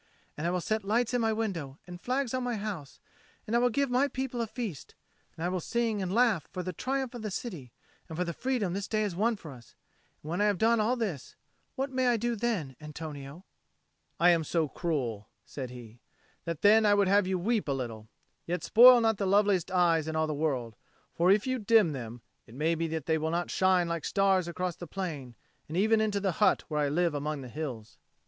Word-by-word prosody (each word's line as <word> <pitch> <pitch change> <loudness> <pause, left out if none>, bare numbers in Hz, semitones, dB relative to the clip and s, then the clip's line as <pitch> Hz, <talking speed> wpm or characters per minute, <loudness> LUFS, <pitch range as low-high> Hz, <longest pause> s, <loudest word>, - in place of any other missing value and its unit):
And 155 +3 -3
I - - +1
will 180 0 -1
set 215 +3 -1
lights 230 +5 0
in 245 - +2
my 225 -1 +2
window 180 -11 -3
and 175 0 -10
flags 255 0 -1
on 255 -1 -1
my 245 -1 -1
house; 200 -9 -6 0.5
and 225 - -2
I - - +5
will 245 0 +3
give 275 +2 0
my 260 +3 +3
people 260 -3 -3
a 230 - -2
feast; 215 - -6 0.4
and 165 - -3
I - - +2
will 185 0 -1
sing 225 +2 -1
and 185 -1 -2
laugh 220 - +2
for 180 -2 -4
the 185 +1 -4
triumph 265 +5 -2
of 240 - -7
the 215 - -3
city 175 - -6 0.4
and 160 - -7
for 180 - +1
the 170 -1 -4
freedom 240 -5 -1
this 200 +1 -3
day 215 -1 0
has 200 -5 -2
won 225 +5 +1
for 160 -7 -10
us: 120 -3 -15 0.5
and 155 - -6
when 175 +4 -1
I - - +4
have 205 -2 +2
done 230 +4 +3
all 225 +4 +2
this, 200 - -4 0.4
what 270 0 -2
may 260 -1 +1
I 240 -1 +3
do 235 +2 -1
then, 200 - -2
Antonio?" 150 +1 -8 0.7
"I 175 +1 +6
am 165 -2 +2
so 160 +1 0
cruel," 130 - -3 0.2
said 130 -3 -6
he, 120 -2 -11 0.5
"that 170 -3 -4
then 215 +2 +6
I 205 -1 +5
would 200 -1 +3
have 200 0 +3
you 190 0 0
weep 215 +3 0
a - - 0
little: 115 -5 -4 0.4
yet 175 +1 -2
spoil 245 +2 +8
not 225 -2 +2
the 195 - -1
loveliest 200 -2 +3
eyes 170 -4 +2
in 160 - -3
all 160 0 +2
the 155 - -2
world; 135 -7 -2 0.4
for 175 +2 +2
if 200 +1 +4
you 260 -1 -1
dim 215 -5 +4
them, 120 -3 -7 0.2
it 115 - -14
may 155 +4 +1
be 165 0 -1
that 160 -2 -4
they 160 -1 +1
will 160 +1 -1
not 170 +2 -2
shine 185 -2 +3
like 170 -2 -3
stars 195 -3 +2
across 175 0 -3
the 175 - -9
plain 150 -9 -5 0.3
and 160 - -4
even 220 +3 +3
into 210 -2 0
the 195 -1 0
hut 210 - +4
where 150 -1 -1
I 145 -1 +1
live 170 +2 +1
among 145 0 -3
the 130 - -8
hills." 125 -6 -6
185 Hz, 235 wpm, -29 LUFS, 155-220 Hz, 0.7 s, spoil